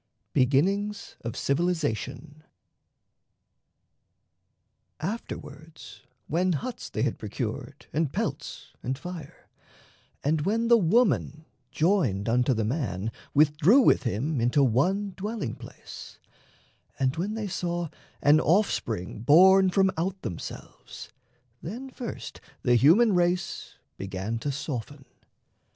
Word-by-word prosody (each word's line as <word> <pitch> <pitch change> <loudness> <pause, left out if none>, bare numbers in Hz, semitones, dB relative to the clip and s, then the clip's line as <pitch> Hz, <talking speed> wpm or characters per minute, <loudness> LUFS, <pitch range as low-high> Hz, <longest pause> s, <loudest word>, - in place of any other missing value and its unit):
BEGINNINGS 195 +11 +1
OF 115 -1 -5
CIVILIZATION 150 - -2 2.6
Afterwards, 160 -5 -7 0.2
When 180 +3 +1
huts 245 - -5
they - - -2
had - - -1
procured - - -5
and 155 -3 0
pelts - - -4
and 130 +2 -3
fire, 165 -1 -9 0.8
And 155 +2 +1
when 225 +7 0
the 235 - +8
woman, 165 - +2 0.2
joined 150 - +1
unto 125 +2 +2
the 110 -1 0
man, 115 - -2 0.2
Withdrew 155 - +5
with - - +4
him 125 +4 -1
into 125 +4 +3
one 185 - +1
dwelling 205 - -4
place, - - -11 0.8
Were 135 - +2
known; - - +4
and 130 - -2
when 195 +6 -2
they 220 -2 -3
saw 175 -2 -2 0.3
an 150 +2 +6
offspring 120 - 0
born 185 - +6
From 190 +1 +3
out 185 +3 -2
themselves, 90 -8 -8 0.5
then 245 +10 -7
first 245 -2 -7 0.2
the 125 - +3
human 175 - +5
race 175 0 0 0.2
Began 95 +4 -4
to 140 +4 -2
soften. 140 0 -5
155 Hz, 110 wpm, -27 LUFS, 130-190 Hz, 2.6 s, the